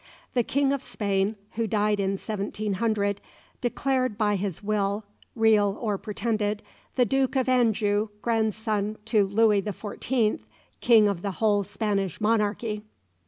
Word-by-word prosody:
The 245 - +3
King 275 +3 +1
of 280 - -2
Spain, 200 0 -1 0.2
who 225 0 -1
died 210 0 +1
in 195 0 +1
1700, 205 0 -1 0.4
declared 255 -2 0
by 210 -1 +2
his 195 -1 -3
will, 205 0 0 0.3
real 215 -3 +3
or 210 -4 -1
pretended, 210 -1 -2 0.3
the 250 - +4
Duke 265 +2 +1
of 260 -1 +1
Anjou, 220 -4 +2
grandson 220 -2 0
to 220 -2 +3
Louis 210 0 +3
the 205 +1 -4
Fourteenth, 220 - -1 0.4
King 225 -3 +6
of 200 -4 -1
the 200 0 -3
whole 205 0 +2
Spanish 200 -3 -2
monarchy. 210 0 0
210 Hz, 135 wpm, -26 LUFS, 205-225 Hz, 0.4 s, King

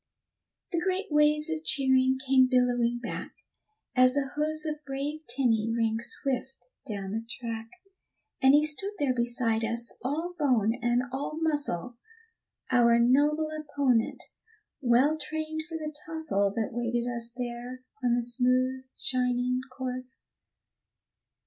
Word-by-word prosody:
The 340 - +1
great 375 +1 -1
waves 300 0 +4
of 320 -1 -3
cheering 265 -3 +3
came 260 -1 +5
billowing 245 -2 +2
back, 235 - -5 0.6
As 255 +1 +5
the 275 -2 -1
hoofs 310 +1 0
of 305 -1 -4
brave 280 +2 -4
Tenny 230 -3 +1
rang 225 -1 +1
swift 260 +1 -2 0.2
down 200 -4 -4
the 225 +2 -2
track; 230 -2 -5 0.7
And 265 +1 +7
he 300 +1 +5
stood 390 +7 -2
there 285 -6 +1
beside 235 -2 +1
us, 235 +1 -1
all 320 +7 -2
bone 235 -7 +3
and 240 +1 +2
all 280 +3 -4
muscle, 285 - -1 0.7
Our 235 -2 +5
noble 295 +6 +3
opponent, 285 -6 0 0.6
well 265 +5 +3
trained 315 +1 -3
for 325 - -4
the 305 -1 -5
tussle 315 -12 0
That 225 -2 -1
waited 240 0 -1
us 235 -1 -2
there 245 +1 -5 0.2
on 240 -1 +3
the 240 - 0
smooth, 255 +2 +1
shining 250 0 0
course. 255 -1 -4
255 Hz, 130 wpm, -28 LUFS, 240-295 Hz, 0.7 s, And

